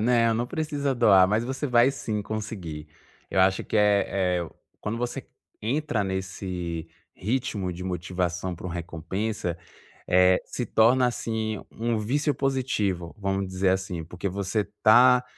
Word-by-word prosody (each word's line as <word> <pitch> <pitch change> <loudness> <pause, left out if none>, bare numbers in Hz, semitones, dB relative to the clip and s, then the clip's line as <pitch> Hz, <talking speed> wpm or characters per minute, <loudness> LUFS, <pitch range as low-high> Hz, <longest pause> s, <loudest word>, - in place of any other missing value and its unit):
Não, 115 0 +3
não 120 +2 -1
precisa 145 -1 -1
doar, 95 -6 +6
mas 110 +3 +1
você 135 +4 -3
vai 120 0 +5
sim, 105 -6 -3
conseguir. 100 -8 -5 0.4
Eu 95 - +2
acho 95 0 +3
que, - - -2
eh 105 -1 +4 0.3
eh 85 - -4 0.3
,quando 105 +2 -3
você 120 +1 -4 0.3
entra 120 -1 0
nesse 95 -3 -4 0.3
ritmo 110 -3 -2
de 90 +1 -7
motivação 90 0 -2
para 85 - -8
uma 90 - -5
recompensa, 90 +3 -3 0.5
eh, 90 0 +5
se 125 - -4
torna 120 +4 +4
assim, 110 -2 -2
um 115 0 -1
vício 140 +8 0
positivo, 110 -11 -1
vamos 95 -1 -1
dizer 95 +1 +1
assim, 95 -3 -1
porque 90 +4 -5
você 100 +2 -2
está 120 +5 +5
105 Hz, 145 wpm, -26 LUFS, 90-120 Hz, 0.5 s, doar